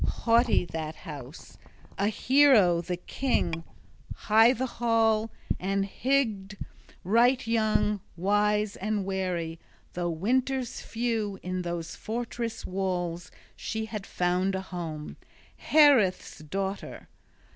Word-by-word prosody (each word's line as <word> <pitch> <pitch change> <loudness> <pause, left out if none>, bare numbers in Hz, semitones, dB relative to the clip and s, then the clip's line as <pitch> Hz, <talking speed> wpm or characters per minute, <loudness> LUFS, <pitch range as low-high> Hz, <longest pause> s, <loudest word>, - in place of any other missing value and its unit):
Haughty 235 -4 +3
that 160 -1 -5
house, 145 -1 -10 0.4
a 200 - 0
hero 220 -7 +4
the 175 +1 -4
king, 175 -6 -1 0.5
high 225 +3 +5
the 260 +1 -1
hall, 225 -2 +1 0.3
and 195 +1 0
Hygd 215 -5 0
{27b} - - -30 0.4
right 240 +7 +3
young, 215 -2 +1 0.2
wise 205 +3 +1
and 210 0 -2
wary, 180 -4 -2 0.3
though 175 0 -2
winters 250 +9 -1
few 225 -4 -2
in 185 0 -3
those 170 -1 -4
fortress 230 0 -4
walls 180 -2 -3 0.3
she 220 0 -4
had 210 -3 -6
found 180 +2 0
a 190 - -2
home, 165 -5 -6 0.5
Haereth's 275 -12 +4
daughter. 195 +6 -5
200 Hz, 110 wpm, -28 LUFS, 180-230 Hz, 0.5 s, high